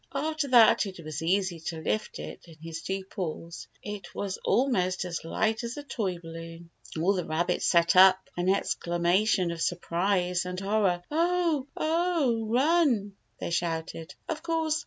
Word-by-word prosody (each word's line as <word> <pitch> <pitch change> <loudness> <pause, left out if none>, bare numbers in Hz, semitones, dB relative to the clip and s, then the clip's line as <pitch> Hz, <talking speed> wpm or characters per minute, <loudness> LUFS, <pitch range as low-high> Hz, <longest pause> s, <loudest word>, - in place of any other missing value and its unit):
After 310 +1 -1
that 235 -4 +6
it 185 -2 -9
was 155 0 -5
easy 185 0 0
to 160 0 -5
lift 215 +6 -2
it - - -8
in 165 - -13
his 165 0 -7
two 190 0 -3
paws. 170 -3 -6 0.2
It 205 -4 -7
was 200 -1 -3
almost 185 -9 +1
as 170 -2 -4
light 220 +7 0
as 235 +3 -5
a 290 - -5
toy 200 -10 -2
balloon. 165 0 -10 0.3
All 185 +5 +3
the 180 -2 -1
rabbits 170 +3 0
set 170 +1 +4
up 185 0 +8 0.2
an 175 +1 0
exclamation 180 0 +1
of 165 -1 -5
sur 175 - +1
prise 180 +1 0
and 180 0 -4
horror. 195 -3 +1
"Oh! 335 -3 +1
Oh! 310 -9 +1
Run!" 250 - +2 0.2
they - - -4
shouted. 165 -1 -3
Of 315 -2 -3
course. 325 -2 0
190 Hz, 160 wpm, -28 LUFS, 170-240 Hz, 0.3 s, up